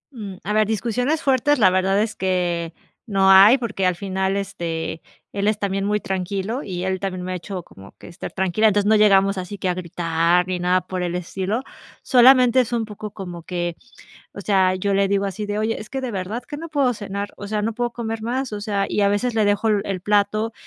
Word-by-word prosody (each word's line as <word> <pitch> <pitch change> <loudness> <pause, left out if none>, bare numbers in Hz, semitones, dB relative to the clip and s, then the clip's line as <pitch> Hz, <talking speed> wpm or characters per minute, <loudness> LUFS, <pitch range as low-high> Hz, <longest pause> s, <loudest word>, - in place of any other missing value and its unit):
Mm, 205 -5 -7
a 210 - -2
ver, 215 -1 +3
discusiones 245 +8 -1
fuertes, 275 +2 +3
la 200 -6 +5
verdad 190 +2 +2
es 220 0 -2
que 175 -3 -1 0.3
no 195 -2 +4
hay 200 +6 +8
porque 220 -6 -2
al 180 - +1
final, 190 +1 -2
este, 165 -5 -4 0.3
él 200 0 -1
es 215 0 +2
también 195 0 -1
muy 210 +1 +1
tranquilo 195 +6 -3
y 180 -2 -5
él 190 0 -1
también 185 -2 -4
me 185 - -3
ha - - -3
hecho 180 +1 -6
como 95 -8 -15
que - - -13
estar 175 +1 -8
tranquila. 190 +3 +1
Entonces 205 -1 +2
no 220 - +5
llegamos 195 -2 +4
así 185 +3 -6
que 190 - -3
a - - +1
gritar 170 0 0
ni 185 -1 -2
nada 180 +1 +2
por 185 0 -5
el 175 -1 -2
estilo, 190 +6 -3 0.4
solamente 255 0 +6
es 245 - -4
un 230 -2 0
poco 210 0 -8
como 180 -4 -8
que, 175 0 -3 0.6
o - - -9
sea, 190 -2 +2
yo 200 +2 -1
le 195 0 +2
digo 200 0 +1
así 205 +2 -4
de: 205 0 -2
"¿Oye? 220 +1 -1
Es 215 - -11
que 270 - -4
de 260 -2 -4
verdad 200 +5 -4
que 290 - -8
no 330 +2 -7
puedo 280 -5 +1
cenar, 200 -1 -5
o 205 - -8
sea, 210 0 -1
no 225 +1 -1
puedo 240 +1 -2
comer 225 -2 -4
más", 250 +2 -3
o 205 - -5
sea, 200 -2 -1
y - - -1
a 200 - +4
veces 230 +4 0
le 220 -1 +2
dejo 205 +2 +1
el 200 -2 0
plato 210 +2 +1
200 Hz, 230 wpm, -22 LUFS, 185-220 Hz, 0.6 s, hay